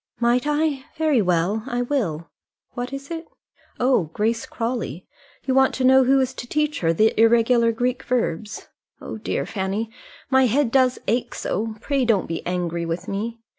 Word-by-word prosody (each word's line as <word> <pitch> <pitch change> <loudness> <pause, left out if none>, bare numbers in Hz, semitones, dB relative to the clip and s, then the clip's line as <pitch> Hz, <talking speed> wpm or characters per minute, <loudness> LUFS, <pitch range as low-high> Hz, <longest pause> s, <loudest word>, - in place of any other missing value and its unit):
"Might 240 +3 +2
I? 295 -2 0
very 310 -6 +3
well; 180 +3 +1
I 245 -1 -1
will. 190 - -2 0.4
What 245 +1 -5
is 275 +3 -7
it? 330 -1 -5 0.5
Oh, 250 -8 +3
Grace 225 +2 -1
Crawley 230 - -4 0.4
you 260 - +1
want 265 0 +4
to 260 - -2
know 260 0 +6
who 270 +2 +4
is 260 0 0
to 245 - -8
teach 300 +2 0
her 165 -1 +2
the 215 +7 +3
irregular 230 +1 +4
Greek 250 +3 -1
verbs. 220 -6 -2 0.3
Oh - - -7
dear, - - -2
Fanny, 205 +3 -3 0.4
my 265 -1 +5
head 250 +1 +1
does 255 -1 +3
ache 235 +4 0
so: 220 +3 -3
pray 275 -1 0
don't 225 -5 +2
be 165 0 -4
angry 175 -1 -2
with 165 +1 -4
me." 225 +4 -4
235 Hz, 170 wpm, -23 LUFS, 210-265 Hz, 0.5 s, know